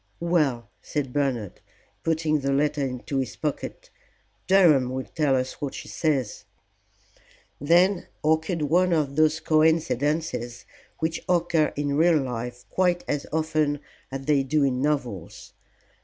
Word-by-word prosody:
"Well," 150 -9 +1
said 135 -4 -3
Bernard, 130 -9 -2 0.4
putting 160 -2 +1
the 140 0 -1
letter 145 +1 +1
into 135 +1 -2
his 125 -2 -3
pocket, - - -5 0.6
"Durham 165 -10 +5
will 130 +1 -3
tell 145 -4 +1
us 130 0 -3
what 140 -2 -3
she - - -8
says." 140 -9 -1 1.2
Then 175 +6 +3 0.2
occurred 160 +1 +1
one 175 +4 +3
of 145 -4 0
those 155 +1 +3
coincidences 155 -5 0 0.3
which 160 0 -2
occur 170 -3 +2
in 145 -1 -1
real 165 +1 +5
life 125 -2 -4
quite 180 -1 +1
as 145 -1 -2
often 155 -2 0 0.3
as 135 0 -5
they 145 -1 +3
do 145 +2 +1
in 130 -2 +1
novels. 125 - -3
150 Hz, 130 wpm, -25 LUFS, 135-160 Hz, 1.2 s, Durham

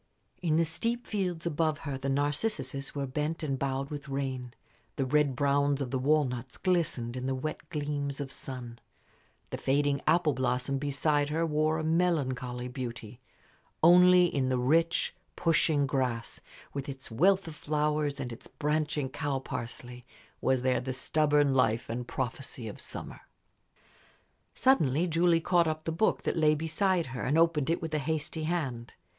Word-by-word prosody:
In 165 -4 +1
the 165 +1 +3
steep 230 +10 -2
fields 180 -6 -2
above 155 -1 0
her 140 -2 -2
the 135 +1 -3
narcissuses 140 - -1
were 140 -1 -1
bent 150 +5 -2
and 135 -3 -1
bowed 135 +1 -2
with 145 -1 -6
rain; 130 -2 -3 0.4
the 135 - 0
red 145 0 +2
browns 140 +1 +2
of 135 -3 -3
the 130 - 0
walnuts 130 -3 0
glistened 160 -10 0
in 130 0 -3
the 135 - 0
wet 155 +3 -5
gleams 145 -2 -3
of 140 -2 -4
sun; 125 -4 -7 0.7
the - - -4
fading 140 +1 +1
apple 160 -1 +4
blossom 130 +1 -1
beside 145 +1 +1
her 165 +2 0
wore 155 0 +1
a 160 - -2
melancholy 135 -7 0
beauty; 120 -2 -7 0.6
only 180 +1 +7
in 135 -6 0
the 130 - +1
rich, 165 +7 +2 0.2
pushing 160 -3 +2
grass, 130 -4 -2 0.3
with 140 0 -4
its 130 -3 -7
wealth 190 - +3
of 160 - -6
flowers 150 -1 0
and 125 -3 -4
its 115 - -10
branching 150 -1 -1
cow 140 +1 -2
parsley, 125 -1 -6 0.4
was 130 -1 +2
there 130 -1 +2
the 130 +1 -3
stubborn 145 +1 +2
life 115 -4 +2
and 120 +1 -4
prophecy 130 -1 -4
of 105 - -7
summer. - - -6 1.3
Suddenly 165 - +3
Julie 170 0 +3
caught 170 -1 +3
up 155 0 -2
the 165 - -2
book 175 +7 +1
that - - -1
lay 155 -1 +4
beside 165 +3 +1
her 125 - -4
and 145 +5 +1
opened 165 -3 +3
it 165 0 0
with 160 -1 -4
a 155 - +1
hasty 155 +1 -2
hand. 135 -9 -3
145 Hz, 160 wpm, -30 LUFS, 130-160 Hz, 1.3 s, only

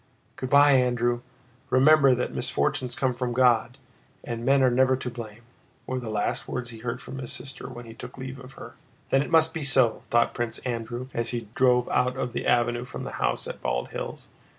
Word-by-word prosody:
"Good 130 - -5
by, 145 +1 +7
Andrew! 120 -2 +2 0.5
Remember 135 0 +6
that 125 - -2
misfortunes 125 -1 -1
come 130 -1 0
from 120 0 -2
God, 125 0 +3 0.5
and 115 -1 -5
men 135 +2 +4
are 130 - +4
never 130 +1 +4
to 125 -1 -5
blame," 115 -1 -9 0.4
were 130 0 -2
the 120 -3 -6
last 105 -1 -2
words 125 -1 -4
he 115 - -10
heard 120 +2 -4
from 130 +1 -8
his 125 - -6
sister 135 -1 -8
when 120 -1 -9
he 115 - -10
took 125 +3 -10
leave 130 0 -7
of 130 0 -12
her. - - -10 0.4
"Then 135 - +4
it - - -3
must 160 -1 +4
be 160 - -4
so!" 130 -4 +2
thought 120 0 +3
Prince 120 -2 -2
Andrew 120 +1 -4
as 115 0 -1
he 115 -3 -4
drove 125 -1 +3
out 125 0 +1
of 125 - -3
the - - -3
avenue 120 0 +2
from 125 - -7
the - - -5
house - - 0
at - - -7
Bald - - -1
Hills. - - -6
125 Hz, 210 wpm, -26 LUFS, 120-130 Hz, 0.5 s, by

